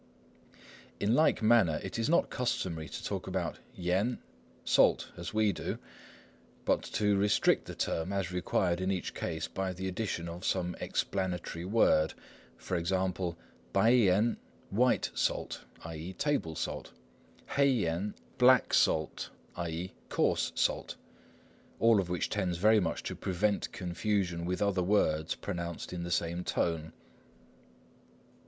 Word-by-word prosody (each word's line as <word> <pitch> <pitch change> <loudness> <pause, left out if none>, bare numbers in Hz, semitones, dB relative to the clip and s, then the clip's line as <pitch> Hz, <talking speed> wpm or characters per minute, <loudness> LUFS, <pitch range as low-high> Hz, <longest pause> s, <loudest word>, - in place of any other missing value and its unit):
In 105 +3 +2
like 155 -4 +3
manner 110 -9 +4
it 95 - -4
is 115 - 0
not 170 - +3
customary 85 - -2
to - - -7
talk - - -3
about - - -2 0.2
yen, 95 +7 0 0.5
"salt," - - +4
as - - -6
we 110 -2 +2
do, - - -4 0.9
but - - +2 0.2
to 105 -1 +3
restrict 100 +1 +3
the - - -7
term 80 +4 -1
as 95 -3 -1
required 90 0 0
in 95 - 0
each 95 -2 -2
case - - -3
by 95 -1 -3
the 95 +1 -4
addition 95 -3 -3
of 85 +2 -7
some 90 -2 0
explanatory 90 -3 -2
word; 95 -6 +3 0.4
for 95 - -4
instance, 90 0 0 0.4
白盐 110 0 +4 0.3
"white 125 +5 +2
salt," - - -1 0.2
i.e. 80 +3 -6
"table 140 - -1
salt"; 60 - -4 0.6
黑盐 105 -9 +1 0.2
"black 125 -1 +6
salt," 80 -1 +2 0.3
i.e. 85 +2 -4 0.2
"coarse - - +1
salt"; - - 0 0.8
all 115 0 +5
of 90 -3 -2
which 90 -2 0
tends 90 -2 -1
very 110 +4 +5
much 95 - -2
to - - -4
prevent 100 +3 0
confusion 90 -1 -1
with 90 +3 0
other 100 -2 +1
words 80 -5 +2
pronounced 85 0 -5
in 90 - -4
the 85 - -4
same 85 +1 -1
tone. 80 -3 -1
95 Hz, 135 wpm, -31 LUFS, 85-105 Hz, 0.9 s, black